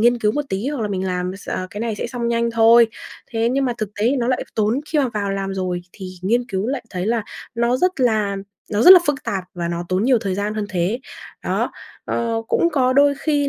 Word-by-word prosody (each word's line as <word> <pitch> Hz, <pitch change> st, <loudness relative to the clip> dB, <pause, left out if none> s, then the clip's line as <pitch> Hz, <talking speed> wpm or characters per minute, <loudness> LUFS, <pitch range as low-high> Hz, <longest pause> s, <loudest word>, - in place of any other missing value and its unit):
nghiên 240 Hz, +2 st, +4 dB
cứu 210 Hz, -2 st, +1 dB
một 295 Hz, +4 st, -1 dB
tí 195 Hz, +7 st, -2 dB
hoặc 285 Hz, -5 st, -3 dB
là 210 Hz, -, -1 dB
mình 190 Hz, -1 st, -2 dB
làm 180 Hz, +1 st, -2 dB
x 195 Hz, -, -14 dB, 0.2 s
cái 205 Hz, -, -6 dB
này 230 Hz, -1 st, -1 dB
sẽ -, -, -3 dB
xong 240 Hz, -2 st, -3 dB
nhanh 235 Hz, 0 st, +1 dB
thôi. 230 Hz, +1 st, +6 dB, 0.4 s
Thế 230 Hz, -1 st, +1 dB
nhưng 270 Hz, +2 st, +1 dB
mà 245 Hz, -, 0 dB
thực 215 Hz, -, -2 dB
tế 220 Hz, -, +3 dB
thì 275 Hz, -, +2 dB
nó 245 Hz, -1 st, 0 dB
lại 255 Hz, -, 0 dB
tốn 220 Hz, +4 st, +1 dB
khi 310 Hz, -, 0 dB
mà 275 Hz, -3 st, +2 dB
vào 200 Hz, -1 st, -1 dB
làm 195 Hz, 0 st, -3 dB
rồi 180 Hz, -2 st, -2 dB
thì 190 Hz, -2 st, -8 dB, 0.2 s
nghiên 235 Hz, +6 st, +1 dB
cứu 195 Hz, -1 st, -2 dB
lại 260 Hz, -1 st, -3 dB
thấy 185 Hz, +1 st, -3 dB
là 230 Hz, 0 st, +1 dB, 0.3 s
nó 235 Hz, +1 st, +2 dB
rất 360 Hz, +1 st, 0 dB
là 215 Hz, -5 st, +2 dB, 0.4 s
nó 210 Hz, +2 st, +2 dB
rất 360 Hz, -, +9 dB
là 370 Hz, -, +10 dB
phức 290 Hz, -2 st, 0 dB
tạp 190 Hz, -2 st, -2 dB
và 170 Hz, -1 st, -3 dB
nó 170 Hz, 0 st, -3 dB
tốn 185 Hz, +2 st, +1 dB
nhiều 255 Hz, -1 st, +4 dB
thời 195 Hz, -3 st, -2 dB
gian 205 Hz, +2 st, -2 dB
hơn 215 Hz, -1 st, -2 dB
thế. 190 Hz, +6 st, -1 dB, 0.4 s
Đó, -, -, 0 dB, 0.3 s
ờ, 230 Hz, -1 st, -1 dB
cũng 340 Hz, -, +3 dB
có 255 Hz, -3 st, +2 dB
đôi 285 Hz, +1 st, +5 dB
khi 290 Hz, -1 st, +1 dB
225 Hz, 255 wpm, -21 LUFS, 195-250 Hz, 0.4 s, là